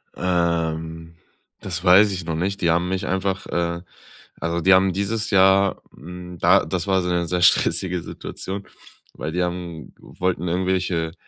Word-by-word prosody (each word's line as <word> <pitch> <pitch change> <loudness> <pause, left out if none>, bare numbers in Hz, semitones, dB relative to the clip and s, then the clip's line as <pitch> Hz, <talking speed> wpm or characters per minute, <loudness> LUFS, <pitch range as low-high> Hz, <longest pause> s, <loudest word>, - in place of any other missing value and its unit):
Ähm, 80 -2 -2 0.4
das 85 -2 -5
weiß 95 +3 +6
ich 90 -3 -5
noch 80 - -2
nicht. 95 +5 -2
Die 85 - +2
haben 85 +2 +1
mich 95 +1 -2
einfach, 95 +1 -1
äh, 85 0 -2 0.6
also 85 +1 -2
die 95 +3 +5
haben 95 0 +4
dieses 105 +3 -2
Jahr, 95 0 +4
hm 90 +3 -10
da, - - +4
das 90 0 -3
war 95 -1 +2
so 90 - -2
'ne 85 -1 0
sehr 90 +1 -1
stressige 90 0 +2
Situation, 95 +4 -7 0.5
weil 80 - -5
die 90 +1 0
haben 85 -4 -5
wollten 90 -1 -3
irgendwelche 90 -2 -1
90 Hz, 160 wpm, -22 LUFS, 85-95 Hz, 0.6 s, weiß